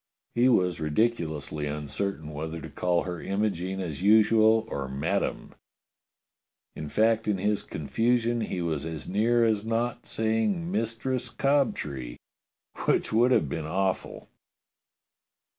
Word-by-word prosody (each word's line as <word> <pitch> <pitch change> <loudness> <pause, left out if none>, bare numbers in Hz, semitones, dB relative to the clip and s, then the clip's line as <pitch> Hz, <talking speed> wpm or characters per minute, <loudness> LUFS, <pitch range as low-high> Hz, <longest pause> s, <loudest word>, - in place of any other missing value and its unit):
He 120 +2 +4
was 90 -8 +2
ridiculously 75 -4 -1
uncertain 75 +3 -3
whether 80 +2 -5
to - - -8
call 90 -1 +1
her 90 -3 -5
Imogene 95 -2 -1
as 85 -4 -4
usual, 110 +2 +5
or 70 -9 -4
Madame; 65 +1 -2 1.2
in 75 0 -6
fact 110 +3 +2
in 105 -2 +1
his 105 +2 0
confusion 115 +8 0
he 90 -5 -3
was 80 -4 -2
as 80 -1 -6
near 115 +4 +3
as 110 -2 +1
not 120 +2 -2
saying 115 - 0
Mistress 120 - -1
Cobtree, 75 - 0 0.7
which - - +1
would 120 +3 +4
have 125 - +3
been 80 +2 -4
awful. 95 +3 -2
100 Hz, 125 wpm, -27 LUFS, 80-115 Hz, 1.2 s, usual